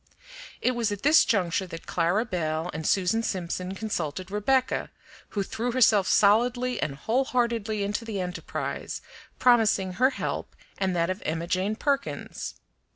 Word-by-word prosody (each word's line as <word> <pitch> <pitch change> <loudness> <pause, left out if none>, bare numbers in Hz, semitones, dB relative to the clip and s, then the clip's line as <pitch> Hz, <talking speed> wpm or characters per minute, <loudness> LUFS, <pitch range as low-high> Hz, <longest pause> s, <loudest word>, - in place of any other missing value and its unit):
It 255 - +3
was 235 -3 -1
at 205 -1 -5
this 300 +3 +7
juncture 190 -5 +1
that 165 -1 -9
Clara 180 +7 +1
Belle 160 -4 -2
and 160 0 -3
Susan 195 +4 +2
Simpson 185 -2 -3
consulted 185 -4 -3
Rebecca, 255 +6 +1 0.4
who 200 - -1
threw 235 +4 -3
herself 220 -6 +4
solidly 245 +4 +3
and 140 - -2
wholeheartedly 230 - 0
into 205 +3 -2
the 220 -3 -4
enterprise, 180 0 -4 0.3
promising 220 -6 +3
her 255 +8 +4
help - - -4 0.2
and 190 -2 0
that 170 +1 +1
of 185 - -5
Emma 160 +2 -2
Jane 185 +4 0
Perkins. 280 +3 -2
205 Hz, 145 wpm, -27 LUFS, 180-235 Hz, 0.4 s, this